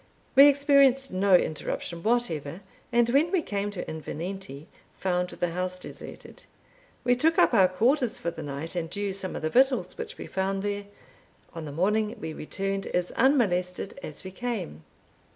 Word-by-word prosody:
We 275 +2 +10
experienced 275 -3 +4
no 190 0 +4
interruption 170 +1 -1
whatever, 180 -8 -1 0.3
and 240 -1 +4
when 290 +7 +3
we 370 -4 +1
came 200 -3 -2
to 205 -3 -5
Invernenty, 160 -1 -6 0.3
found 180 -1 0
the 175 -1 -2
house 185 +1 -2
deserted. 180 - -10 0.6
We 245 0 +3
took 320 +6 +2
up - - +5
our 190 -2 +6
quarters 240 +7 +1
for 170 - -3
the 165 - -8
night, 145 +4 -6
and 165 0 -3
used 200 -1 -2
some 185 -1 -4
of - - -5
the 155 - +1
victuals 265 +1 +3
which 465 +1 -6
we - - -7
found 195 +1 -2
there. 205 0 -2 0.7
On 165 -2 -6
the 145 - -6
morning 210 +7 0
we 160 - -5
returned 195 +5 -3
as 180 0 -1
unmolested 200 -6 +1
as 150 - -6
we 190 - -7
came. 190 - -4
195 Hz, 170 wpm, -27 LUFS, 175-245 Hz, 0.7 s, We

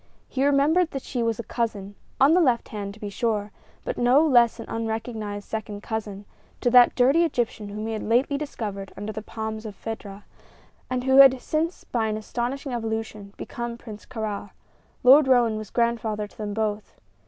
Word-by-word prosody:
He 265 - -1
remembered 290 +5 +3
that 270 -4 -6
she 245 - -3
was 230 -2 0
a 235 - -5
cousin 210 -5 -3 0.3
on 275 +4 +6
the 360 - +5
left 250 -7 +2
hand, 205 -2 -5
to - - -17
be 205 -2 -6
sure, 210 -1 -1 0.3
but - - -3
no 250 +6 +5
less 240 -6 +4
an - - -6
unrecognized 220 -2 -4
second 210 -2 -5
cousin 210 -2 -5 0.3
to 245 - +1
that 245 0 +7
dirty 270 +7 +4
Egyptian 235 -9 -2
whom 210 +1 -5
he 225 - -3
had 215 - -3
lately 245 +6 +1
discovered 210 -9 -5
under 205 +2 -5
the 215 - -5
palms 220 0 -5
of 215 -3 -7
Fedah, 205 -2 -7 0.7
and 255 -1 -1
who 265 +1 +3
had 270 -1 +8
since, 320 +6 -2
by 225 -2 -1
an 215 0 -2
astonishing 245 +5 -4
evolution, 220 -3 -4
become 235 0 -5
Prince 215 -3 -11
Kāra. 215 -4 -4 0.5
Lord 265 +3 +7
Roane 240 -4 +4
was 215 -2 -6
grandfather 230 -3 0
to 205 - -17
them 205 -1 -4
both. 215 -1 -3
225 Hz, 185 wpm, -25 LUFS, 210-255 Hz, 0.7 s, had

